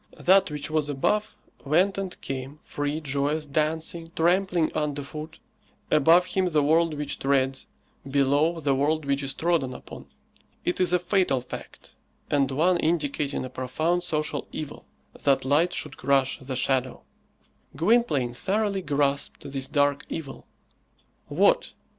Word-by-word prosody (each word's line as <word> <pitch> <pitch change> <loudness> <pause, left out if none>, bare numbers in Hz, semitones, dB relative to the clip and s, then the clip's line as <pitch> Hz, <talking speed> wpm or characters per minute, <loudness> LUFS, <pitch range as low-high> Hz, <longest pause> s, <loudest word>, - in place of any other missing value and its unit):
That 190 0 +4
which 150 0 -4
was 155 -2 0
above 210 +10 0 0.3
went 180 +7 +2
and 195 -2 -4
came, 135 +2 -5
free, 145 +2 -3
joyous, 145 +2 -1
dancing, 160 +3 -2
trampling 175 0 +2
under 145 -2 -2
foot; 155 +3 -8 0.5
above 165 +4 +5
him 190 0 0
the 155 -4 +2
world 160 +2 +3
which 145 -1 -4
treads, 135 -1 +1 0.4
below 145 +4 +2
the 140 -3 +1
world 150 +3 +1
which 140 0 0
is 135 -1 -2
trodden 160 -7 0
upon. - - -11 0.6
It 180 - 0
is 180 - +3
a 180 - +5
fatal 180 -6 +1
fact, 125 - -10 0.4
and 140 -2 +2
one 165 +7 +2
indicating 150 -4 -1
a - - -6
profound 155 +8 -1
social 155 -1 -2
evil, 150 -2 -7 0.4
that 135 -2 +2
light 155 +6 +3
should - - -4
crush 135 0 +1
the 130 0 -5
shadow! 130 0 0 0.7
Gwynplaine 160 - +2
thoroughly 200 - 0
grasped 140 -3 -1
this 135 -1 -1
dark 145 -1 +1
evil. 140 -5 -7 0.8
What! - - +2
150 Hz, 140 wpm, -26 LUFS, 140-170 Hz, 0.8 s, above